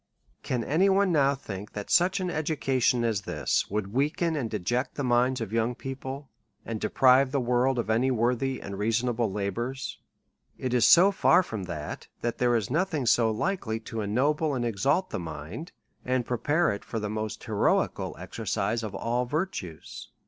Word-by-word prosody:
Can 125 -2 -2
any 170 +10 +3
one 195 -1 +3
now 140 -3 +3
think 105 -6 -8
that 105 -1 -6
such 185 +1 +4
an 180 -1 -2
education 135 -6 +1
as 110 -4 0
this 75 -8 -1
would 105 0 -3
weaken 150 +5 +1
and 130 -7 -2
deject 120 +6 -2
the 145 - -3
minds 125 0 +2
of 110 -1 -5
young 115 +2 +1
peo 135 +2 -5
ple, 135 +1 -7 0.4
and 110 -2 -4
deprive 130 +4 +4
the 140 - +1
world 125 +1 +1
of 120 - -1
any 120 +4 +2
worthy 125 +2 0
and 100 0 -7
reason 115 +4 +1
able 115 -3 0
labours? 120 +7 -3 0.6
It 130 -1 -3
is 120 -2 +5
so 185 +4 +7
far 185 -1 +4
from 105 - -5
that, 75 -4 -6
that 120 -1 -2
there 120 -1 +3
is 110 -1 -1
nothing 160 -3 0
so 115 0 +4
likely 115 - -1
to 110 0 -5
ennoble 140 +8 +1
and 120 -2 -1
exalt 135 - +1
the - - -2
mind, 80 - -7 0.3
and 130 -1 0
prepare 145 +8 +1
it 100 - -5
for 115 - -4
the 105 - -3
inost 110 0 -4
heroical - - 0
exercise 115 +2 -2
of 105 -3 -5
all 120 +4 -1
virtues. 145 - -4
125 Hz, 180 wpm, -27 LUFS, 110-140 Hz, 0.6 s, so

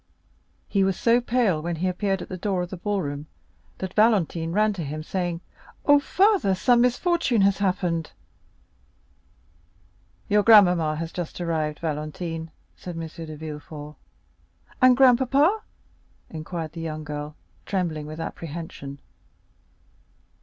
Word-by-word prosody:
He 200 -2 +2
was 190 -1 0
so 235 +1 +4
pale 230 -10 +1
when 170 +1 -2
he 175 +4 -1
appeared 195 +1 -1
at - - -10
the 185 - -4
door 185 -1 -1
of 175 - -7
the - - -4
ball 200 +1 -1
room, 145 +1 -5 0.5
that 190 0 -5
Valentine 185 -7 +2
ran 210 +3 +2
to 180 -4 -5
him, 155 +2 -5
saying: 175 -1 -3 0.4
"Oh, 290 0 +7
father, 375 - +3
some 240 +5 +4
misfortune 250 - +2
has 195 0 +3
happened!" 180 -4 -1 2.2
"Your 210 0 +4
grandmamma 180 -8 +6
has 165 +1 -4
just 175 -1 -5
arrived, 160 -3 -1
Valentine," 160 +1 -4 0.3
said 175 -2 -8
M. 165 - -4
de 160 -1 -8
Villefort. 150 -1 -8 0.9
"And 255 -1 +6
grandpapa?" 270 - +4 0.7
inquired 160 0 -5
the 165 - -7
young 155 -1 -4
girl, 150 0 -6 0.3
trembling 165 -6 -2
with 155 +1 -8
apprehension. 160 -4 -7
175 Hz, 130 wpm, -25 LUFS, 155-210 Hz, 2.2 s, Oh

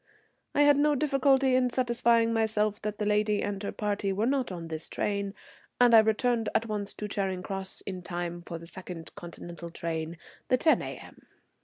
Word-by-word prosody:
I 290 - +5
had 290 -1 +6
no 295 0 +3
difficulty 275 -2 +3
in 255 0 +3
satisfying 235 -2 +2
myself 215 -2 +1
that 210 0 -3
the 210 - -2
lady 210 0 +2
and 200 -1 -3
her 200 - -3
party 205 -2 -1
were 205 +3 0
not 265 0 +1
in 170 -3 -6
this 160 -1 -5
train, 200 -1 -2 0.4
and 245 -1 +6
I 225 - +10
returned 225 +1 +2
at 230 - +2
once 210 -2 -3
to 210 - -4
Charing 190 -2 -2
Cross 195 -1 -3
in 185 -2 -6
time 175 -1 -4
for 170 -1 -7
the 165 - -11
second 175 -2 -7
Continental 170 0 -9
train, 165 0 -4 0.3
the 255 - +3
10 315 +5 +4
A.M. - - -9
210 Hz, 185 wpm, -29 LUFS, 185-235 Hz, 0.4 s, I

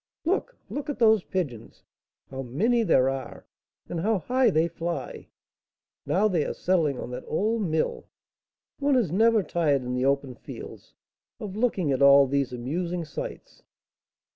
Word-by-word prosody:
Look! 400 +8 -1
look 290 +1 -5
at 290 - -3
those 220 -5 +4
pigeons! 130 - -5 0.5
how 135 0 -5
many 200 - +1
there 135 - +3
are! 135 -2 -5 0.4
and 170 - -4
how 215 +5 +1
high 250 +6 +2
they 165 -3 +2
fly! 170 -5 -5 0.8
Now 205 +4 +3
they 175 -7 +1
are - - -4
settling 165 -7 +1
on 125 - -6
that 125 +1 -6
old 215 +7 0
mill. 160 -1 -1 0.7
One 285 -1 +2
is 225 -11 +1
never 220 +2 +4
tired 150 -7 +1
in 125 0 -3
the 125 +1 0
open 140 -1 0
fields 120 - -11 0.4
of 200 -2 -6
looking 210 - 0
at 135 - 0
all 140 0 +8
these 140 -1 0
amusing 165 +8 -3
sights." 150 - -8
170 Hz, 155 wpm, -26 LUFS, 135-215 Hz, 0.8 s, all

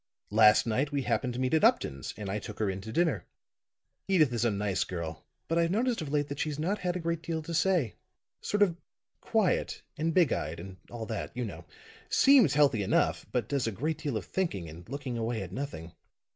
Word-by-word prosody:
Last 105 0 +6
night 125 +6 0
we 140 -2 -1
happened 125 0 0
to - - -4
meet 130 +2 0
at 160 - +3
Upton's, 70 0 +2
and 105 -2 -5
I 100 +2 -2
took 105 0 -8
her 105 -3 0
in 95 0 -6
to 110 +3 -7
dinner. 140 - +1 0.8
Edyth 155 -9 +4
is 115 -1 0
a 120 - +3
nice 100 -2 0
girl, 80 -3 -6 0.2
but 165 +1 +1
I've 165 0 +2
noticed 230 +3 +1
of 155 - -4
late 145 -1 +1
that 140 - -5
she's 150 -3 -1
not 185 +7 -1
had 180 0 -1
a - - -1
great 170 -1 -2
deal 165 -1 -3
to 170 - -6
say. 165 - +2 0.5
Sort 205 0 +2
of 175 -4 +1 0.4
quiet 215 -6 0 0.2
and 165 +1 +1
big 170 -3 +4
eyed 80 +2 -3
and 95 +2 -9
all 115 -2 -6
that, 110 -2 -4
you 125 - -1
know. 105 - -8 0.4
Seems 255 - +6
healthy 140 -7 +4
enough, 95 - +1
but 120 -4 -1
does 135 -2 0
a - - 0
great 150 +9 -2
deal 145 -8 -2
of 100 - -5
thinking 165 - -2
and 85 +6 -11
looking 135 -3 -4
away 115 -2 -2
at 90 - -9
nothing. 95 - -5
130 Hz, 220 wpm, -30 LUFS, 105-165 Hz, 0.8 s, Last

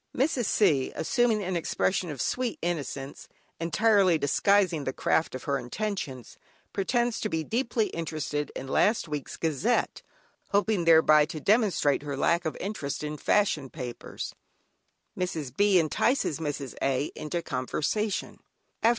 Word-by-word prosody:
Mrs. 265 -3 +1
C., 150 -12 +2
assuming 225 +4 +1
an 185 0 -2
expression 175 +1 0
of 145 -4 -3
sweet 250 -2 -1
innocence, 145 -5 -4 0.3
entirely 190 +1 +3
disguising 175 +3 +2
the 130 - -2
craft 160 0 0
of 130 - -6
her 140 -1 0
intentions, 135 - -5 0.3
pretends 240 +4 0
to 215 - -2
be 160 -3 -1
deeply 230 +2 0
interested 155 -3 -3
in 135 - -6
last 210 - +2
week's 150 -2 -5
"Gazette," 165 - 0 0.5
hoping 200 -3 +1
thereby 160 -2 +6
to 160 -1 -6
demonstrate 195 - +2
her 145 -2 -4
lack 170 +4 +2
of 160 - -2
interest 170 -9 -4
in 150 0 -3
fashion 155 -5 +1
papers; 125 -5 -6 0.8
Mrs. 155 -8 -3
B. 200 0 +4
entices 165 - +1
Mrs. 145 -4 -4
A. 135 +1 0
into 170 +3 -3
conversation. 175 - -2
165 Hz, 135 wpm, -28 LUFS, 145-205 Hz, 0.8 s, thereby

